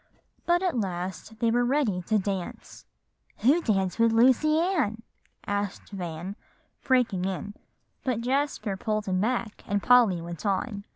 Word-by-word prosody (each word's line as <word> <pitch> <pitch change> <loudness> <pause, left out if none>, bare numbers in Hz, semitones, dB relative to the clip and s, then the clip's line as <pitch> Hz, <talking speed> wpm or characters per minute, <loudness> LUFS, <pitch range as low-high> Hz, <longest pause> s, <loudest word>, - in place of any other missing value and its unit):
But 350 +1 +3
at 360 -6 0
last 190 +2 -4
they 230 +1 +1
were 245 +1 +2
ready 245 -8 +1
to 220 - +3
dance." 195 -3 -5 0.6
"Who 285 +9 +4
danced 195 - 0
with 230 0 +5
Lucy 260 +7 +4
Ann?" 300 - 0 0.4
asked 205 0 -3
Van, 180 0 -5 0.5
breaking 245 -8 +2
in; 195 +2 -4 0.5
but 250 -4 -1
Jasper 260 -5 -1
pulled 215 +2 -2
him 185 -1 0
back, 230 -1 -2
and 200 0 -1
Polly 240 -8 +5
went 170 -1 -7
on. 200 +1 -2
215 Hz, 140 wpm, -27 LUFS, 195-250 Hz, 0.6 s, with